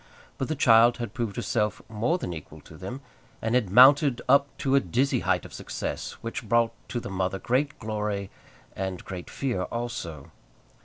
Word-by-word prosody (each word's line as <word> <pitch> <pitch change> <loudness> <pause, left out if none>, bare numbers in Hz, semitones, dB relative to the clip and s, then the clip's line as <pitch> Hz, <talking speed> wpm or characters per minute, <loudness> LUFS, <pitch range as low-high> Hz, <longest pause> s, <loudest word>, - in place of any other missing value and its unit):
But 135 - -1
the 155 - -1
child 120 -3 +6
had 120 -4 -5
proved 115 -6 -3
herself 105 -3 -1
more 115 +10 0
than 90 - -4
equal 80 -3 -9
to 80 - -14
them, 95 - -7 0.4
and 110 +1 -2
had 120 -6 +2
mounted 130 - +7
up 140 +2 +5
to 135 - 0
a 140 - +7
dizzy 130 +7 +1
height - - 0
of - - -11
success, - - -5
which 115 -1 -5
brought 115 0 +3 0.2
to 120 - -2
the 110 - -7
mother 95 0 -1
great 135 +8 0
glory 105 -3 -3 0.4
and 95 -2 -4
great 90 -2 -7
fear 125 -9 -2
also. 115 - -5
115 Hz, 175 wpm, -27 LUFS, 95-130 Hz, 0.4 s, mounted